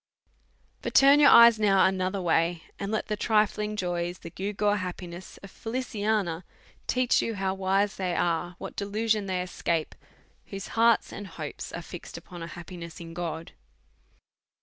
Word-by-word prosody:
But -, -, -5 dB
turn 275 Hz, +2 st, +7 dB
your 285 Hz, -1 st, +8 dB
eyes 235 Hz, -1 st, +8 dB
now 195 Hz, -2 st, +4 dB
another 190 Hz, +1 st, 0 dB
way, 170 Hz, -1 st, +1 dB, 0.2 s
and 200 Hz, +1 st, -3 dB
let 220 Hz, -, -1 dB
the 210 Hz, -, -2 dB
trifling 210 Hz, -1 st, +1 dB
joys, 175 Hz, -2 st, -2 dB
the 170 Hz, -, -10 dB
gewgaw 205 Hz, +2 st, 0 dB
happiness 180 Hz, -1 st, -7 dB
of 195 Hz, -, -10 dB
Feliciana, 215 Hz, -7 st, -2 dB, 0.4 s
teach 255 Hz, -1 st, +2 dB
you 225 Hz, -, -2 dB
how 190 Hz, -1 st, -1 dB
wise 195 Hz, +1 st, 0 dB
they 180 Hz, -2 st, -1 dB
are, 175 Hz, +1 st, 0 dB
what -, -, -8 dB
delusion 210 Hz, +1 st, 0 dB
they 185 Hz, -1 st, -1 dB
escape, 170 Hz, -3 st, -2 dB, 0.5 s
whose 195 Hz, -1 st, -7 dB
hearts 230 Hz, 0 st, +3 dB
and 205 Hz, -, -7 dB
hopes -, -, -7 dB
are -, -, -6 dB
fixed -, -, -9 dB
upon 175 Hz, -2 st, -10 dB
a 165 Hz, -, -5 dB
happiness 170 Hz, 0 st, -9 dB
in 165 Hz, -1 st, -9 dB
God. 165 Hz, -1 st, -5 dB
195 Hz, 155 wpm, -27 LUFS, 175-210 Hz, 0.5 s, your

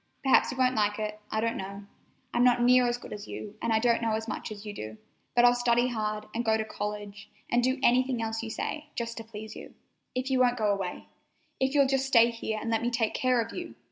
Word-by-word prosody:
Perhaps 270 Hz, -, +5 dB
you 260 Hz, -, -7 dB
won't 255 Hz, 0 st, +3 dB
like 210 Hz, -2 st, +1 dB
it—I 215 Hz, 0 st, -4 dB
don't 230 Hz, +1 st, 0 dB
know. 195 Hz, +1 st, -6 dB, 0.5 s
I'm 240 Hz, -, +3 dB
not 245 Hz, -1 st, +5 dB
near 250 Hz, 0 st, +5 dB
as 240 Hz, 0 st, 0 dB
good -, -, -9 dB
as 210 Hz, 0 st, -8 dB
you, 210 Hz, -, -7 dB
and 230 Hz, -, 0 dB
I 220 Hz, -, +4 dB
don't 235 Hz, +1 st, +2 dB
know 225 Hz, -1 st, 0 dB
as 220 Hz, +1 st, -2 dB
much 215 Hz, -, -5 dB
as 210 Hz, 0 st, -8 dB
you 210 Hz, -, -5 dB
do, 110 Hz, -, -7 dB, 0.4 s
but 240 Hz, 0 st, +6 dB
I'll 245 Hz, -, +7 dB
study 245 Hz, 0 st, +2 dB
hard, 215 Hz, -2 st, -2 dB
and 235 Hz, -, -1 dB
go 220 Hz, -1 st, +3 dB
to 220 Hz, -, -2 dB
college, 210 Hz, -1 st, -6 dB, 0.2 s
and 240 Hz, -, +4 dB
do 260 Hz, +2 st, +2 dB
anything 255 Hz, 0 st, +3 dB
else 225 Hz, 0 st, -2 dB
you 225 Hz, -, -5 dB
say, 300 Hz, +7 st, -4 dB
just 235 Hz, -1 st, -3 dB
to 225 Hz, -, -5 dB
please 220 Hz, -1 st, -9 dB
you. -, -, -11 dB, 0.4 s
If 255 Hz, +2 st, -2 dB
you 260 Hz, -, +3 dB
only 250 Hz, -, +6 dB
won't 245 Hz, 0 st, -1 dB
go 215 Hz, -3 st, +2 dB
away. 190 Hz, -3 st, -4 dB, 0.5 s
If 265 Hz, +2 st, +1 dB
you'll 280 Hz, -1 st, +6 dB
just 270 Hz, 0 st, +1 dB
stay 235 Hz, -3 st, +5 dB
here 225 Hz, -1 st, -4 dB
and 230 Hz, -, -3 dB
let 225 Hz, -, +1 dB
me 240 Hz, -, 0 dB
take 230 Hz, -2 st, 0 dB
care 255 Hz, -1 st, +2 dB
of 230 Hz, 0 st, -6 dB
you! 350 Hz, -1 st, -6 dB
230 Hz, 255 wpm, -28 LUFS, 215-245 Hz, 0.5 s, I'll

